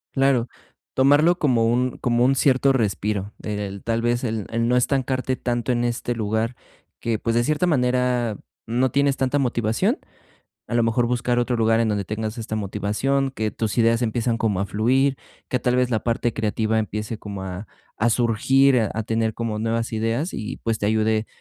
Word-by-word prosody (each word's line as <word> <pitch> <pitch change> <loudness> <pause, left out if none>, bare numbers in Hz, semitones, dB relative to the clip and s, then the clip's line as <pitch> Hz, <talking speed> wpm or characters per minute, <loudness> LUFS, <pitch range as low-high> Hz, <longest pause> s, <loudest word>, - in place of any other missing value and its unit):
Claro, 135 -3 +2 0.5
tomarlo 145 +6 +4
como 125 -8 +2
un 125 +2 0
como 120 0 +2
un 135 +1 +3
cierto 135 0 +3
respiro, 105 -3 -1
el 105 -2 -4
tal 115 0 0
vez 120 +1 0
el 110 -4 -2
el 115 +1 0
no 125 - +2
estancarte 130 0 0
tanto 120 -1 -2
en 120 -1 0
este 120 0 -2
lugar 110 +2 -1 0.4
que, 115 -2 -1
pues, 115 0 -1
de 120 - +3
cierta 155 +6 +1
manera, 125 - +1 0.3
no 125 +3 +1
tienes 140 +1 +2
tanta 135 +2 +1
motivación. 125 - 0 0.7
A - - -5
lo 120 - +3
mejor 115 +1 +2
buscar 120 0 0
otro 120 0 0
lugar 115 0 +3
en 115 - +2
donde 105 -2 -1
tengas 110 +3 -4
esta 110 -1 -4
motivación, 110 +7 -1
que 110 -5 -2
tus 110 -3 -3
ideas 115 0 +3
empiezan 115 0 0
como 110 -5 0
a 100 - -1
fluir, 130 +7 +2 0.3
que 125 - 0
tal 125 +1 +1
vez 125 0 +2
la 110 -2 +1
parte 120 0 0
creativa 110 0 0
empiece 105 +1 -3
como 100 -3 -7
a 95 +2 -6 0.3
a 120 +2 +2
surgir, 125 +3 +3
a 110 - -2
tener 115 0 0
como 110 -2 -3
nuevas 115 +1 -1
ideas 115 - -1
y, 105 - -4
pues, 115 -1 0
te 105 - 0
ayude 110 0 +1
115 Hz, 185 wpm, -23 LUFS, 110-125 Hz, 0.7 s, tomarlo